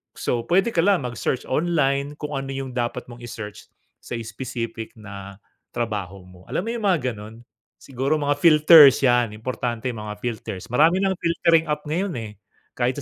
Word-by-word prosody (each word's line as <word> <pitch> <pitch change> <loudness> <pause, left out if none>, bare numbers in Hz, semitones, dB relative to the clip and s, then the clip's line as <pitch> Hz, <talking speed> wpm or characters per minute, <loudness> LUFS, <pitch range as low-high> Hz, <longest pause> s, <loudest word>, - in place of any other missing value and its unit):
So, 120 -1 -2
pwede 195 +6 +3
ka 170 - -1
lang 185 -4 +3
mag-search 125 +1 -2
online 145 -2 +1
kung 150 0 -6
ano 135 - -6
'yung 135 -1 -5
dapat 120 0 -3
mong 120 - -11
i-search 115 -3 -8 0.3
sa - - -7
specific 115 0 -6
na 100 -2 -10 0.4
trabaho 100 -5 -4
mo. 90 0 -17
Alam - - -2
mo 225 - -4
'yung 230 -3 -3
mga 150 -9 +1
ganon? 110 +2 -11 0.3
Siguro 135 +3 -2
mga 145 -1 0
filters, 155 -3 +7
yan 120 -4 +3
importante 120 +1 -3
'yung 115 - -8
mga 105 0 -6
filters. 115 -2 -5
Marami 165 +9 +4
ng 195 - +2
filtering 170 -1 +2
app 150 0 -2
ngayon, 175 +5 -2
eh, 105 - -8 0.4
kahit 125 +1 -1
125 Hz, 170 wpm, -23 LUFS, 115-155 Hz, 0.4 s, filters